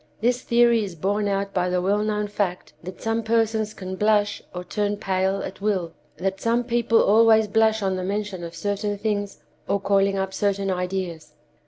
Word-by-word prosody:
This 245 +2 +1
theory 235 -2 +3
is 190 -4 -6
borne 205 +5 0
out 200 0 -1
by 180 0 0
the 180 0 +1
well 200 +3 +1
known 210 -1 -1
fact 200 -3 -3
that 185 +2 -9
some 225 0 0
persons 220 -1 0
can 185 0 -6
blush 210 0 +2
or 180 0 -6
turn 205 +3 -2
pale 190 0 0
at 190 - -7
will; 190 -5 -1 0.2
that 190 +3 -2
some 235 +1 +1
people 235 -1 +2
always 220 +1 +5
blush 220 0 +2
on 190 -1 0
the 185 - -3
mention 200 -1 -3
of 170 0 -7
certain 205 +3 -2
things, 205 -1 -3 0.3
or 200 - +2
calling 195 0 +2
up 190 0 -2
certain 200 -1 0
ideas. 180 -4 -4
200 Hz, 185 wpm, -24 LUFS, 190-215 Hz, 0.3 s, always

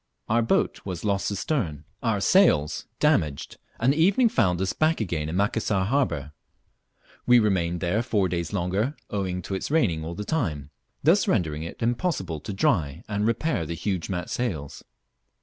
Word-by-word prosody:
Our 115 +2 +2
boat 115 - 0
was 90 -1 -5
lost 100 -1 0
astern, 95 - -2 0.2
our 115 -4 +1
sails 90 - +3
damaged, 75 -3 +1 0.2
and 125 +4 +3
the 155 - 0
evening 200 +8 +4
found 90 - +2
us 95 0 0
hack 160 +1 +3
again 85 -7 -2
in 80 - -3
Macassar 100 0 +1
harbour. 90 - 0 1.0
We 125 0 +7
remained 90 -6 +1
there 95 +5 +1
four 105 -5 +1
days 85 -2 -3
longer, 100 +8 -1 0.2
owing 95 -3 -2
to 95 - -5
its 95 - -3
raining 100 - +1
all 85 +2 -5
the 105 +2 -5
time, 75 - -2 0.3
thus 170 +6 +4
rendering 80 -7 0
it 85 +7 -6
impossible 115 - -1
to 105 - -6
dry 95 - 0
and 105 +1 0
repair 120 - 0
the 85 - -3
huge 90 +1 -3
mat 90 -2 -3
sails. 80 - -3
100 Hz, 165 wpm, -25 LUFS, 85-120 Hz, 1.0 s, We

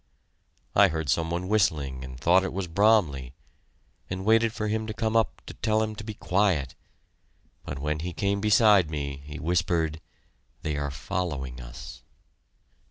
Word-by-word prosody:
I - - +7
heard 80 -3 -3
some 80 +4 0
one 90 +2 -2
whistling 75 -11 +1
and 65 -1 -9
thought 90 +7 +4
it 95 - -2
was 95 0 -3
Bromley, 80 - +2 0.7
and 95 +1 -4
waited 115 +1 +4
for 110 -2 -3
him 110 +1 -1
to 110 - -5
come 110 0 -1
up 115 -1 +1
to - - -8
tell 110 0 +1
him 110 0 -3
to 110 - -7
keep 110 -1 -8
quiet, 95 -7 +1 0.9
but 70 - -5
when 75 +2 -2
he 90 +3 -4
came 100 +2 -1
beside 105 -4 +5
me, 70 -2 -4
he 75 +1 -8
whispered, 80 -2 0 0.6
"They 75 -2 -1
are 70 0 -2
following 70 -4 -4
us." 60 +2 -10
85 Hz, 165 wpm, -27 LUFS, 70-105 Hz, 0.9 s, I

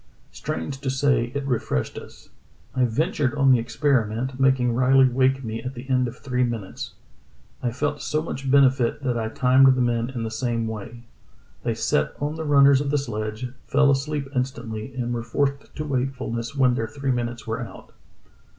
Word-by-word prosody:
Strange 80 +12 -4
to 135 - -2
say, 130 -3 +1
it 140 -1 -2
refreshed 115 - -1
us. - - -11 0.4
I 130 -1 +2
ventured 140 +2 0
on 135 -2 +4
the 125 - +5
experiment, 125 0 0
making 130 -3 +3
Riley 130 +2 +5
wake 130 +1 +2
me 115 0 -4
at 130 +1 -6
the 125 +2 -8
end 125 -1 +3
of 120 - -8
three 125 -2 -1
minutes. 115 -5 -4 0.7
I 120 - 0
felt 145 +4 -2
so 155 - 0
much 135 -4 -4
bene 135 -1 +6
fited 130 0 -2
that 130 -3 -1
I 110 -1 -1
timed 130 +1 +5
the - - -1
men 120 -1 +1
in 125 -3 -4
the 110 - -3
same 115 0 -1
way. 110 +2 -7 0.6
They - - -1
sat 75 - 0
on 145 +1 -1
the 160 0 -5
runners 140 -2 +6
of 145 - -2
the 145 - +2
sledge, 110 -3 -3 0.2
fell 145 0 +4
asleep 140 +1 -1
instantly, 120 -3 -3
and 120 -1 -2
were 120 - -2
forced 140 +3 -2
to 150 - -4
wakefulness 130 -3 -2
when 130 -3 +4
their 115 -2 -1
three 140 0 -2
minutes 120 -1 -3
were 115 +2 -3
out." 120 - -10
130 Hz, 185 wpm, -24 LUFS, 120-135 Hz, 0.7 s, bene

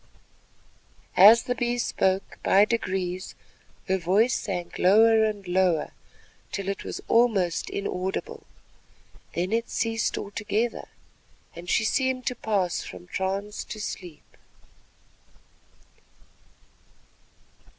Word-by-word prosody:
As 215 +5 +8
the 250 - -1
Bee 240 0 -1
spoke, 190 -5 -1
by 200 +2 +5
degrees 185 -4 -3 0.5
her 190 0 +1
voice 200 +8 +2
sank 180 -4 -4
lower 220 +4 +5
and 210 -3 -2
lower 180 -3 +1 0.6
till 195 -1 -4
it 195 - -4
was - - -6
almost 220 -8 +2
inaudible. 190 -1 -4 0.9
Then 180 +3 -1
it 230 +1 0
ceased 225 -1 -1
altogether 210 +3 -2 0.7
and 175 +1 -9
she 220 - +2
seemed 260 +1 0
to 250 - -1
pass 195 -7 -1
from 175 - -10
trance 195 +3 -3
to 215 - -8
sleep. 180 -6 -7
200 Hz, 100 wpm, -26 LUFS, 185-225 Hz, 0.9 s, As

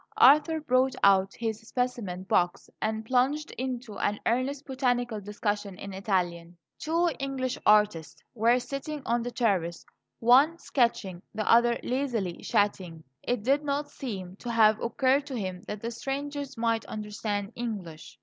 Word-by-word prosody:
Arthur 300 +4 +6
brought 260 -2 +2
out 195 -1 +4
his 220 -2 -3
specimen 225 -6 -3
box 180 0 0
and 220 0 -2
plunged 270 +6 +1
into 250 -4 -5
an 205 +1 0
earnest 265 +4 0
botanical 245 -5 -1
discussion 205 -1 -3
in 200 -1 -7
Italian. 175 -3 -2 0.2
Two 335 +3 +1
English 265 -2 -2
artists 210 -6 +3
were 235 +1 +3
sitting 275 +3 -5
on 235 +1 +1
the 240 - -3
terrace; 190 -9 0 0.3
one 270 +8 +5
sketching, 230 - 0
the 215 - -2
other 235 0 +5
lazily 240 -9 -1
chatting. 180 -5 0 0.2
It 245 -4 -2
did 275 +5 +2
not 290 0 -2
seem 190 -7 -6
to 245 - -7
have 220 -2 +4
occurred 265 +4 +1
to 270 - -5
him 185 -4 -4
that 210 -1 -5
the 230 - -2
strangers 280 +2 -4
might 230 -1 +1
understand 210 -1 -4
English. 195 - -6
230 Hz, 145 wpm, -28 LUFS, 205-260 Hz, 0.3 s, Arthur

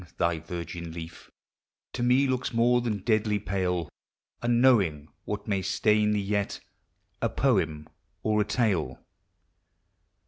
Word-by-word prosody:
thy 85 -1 +1
virgin 85 0 -6
leaf 85 0 -9 0.6
To 125 - -4
me 125 +3 +4
looks 130 -1 -1
more 120 +1 +4
than 105 -5 -2
deadly 110 -2 +2
pale, 90 -3 -1 0.5
Unknowing 115 - +3 0.2
what 105 0 -4
may 100 -2 0
stain 105 +3 +2
thee 105 - +1
yet, 100 0 -1 0.6
A - - +1
poem 75 -1 0 0.4
or 105 -1 +2
a - - +3
tale. 100 - 0
100 Hz, 125 wpm, -27 LUFS, 85-115 Hz, 0.6 s, me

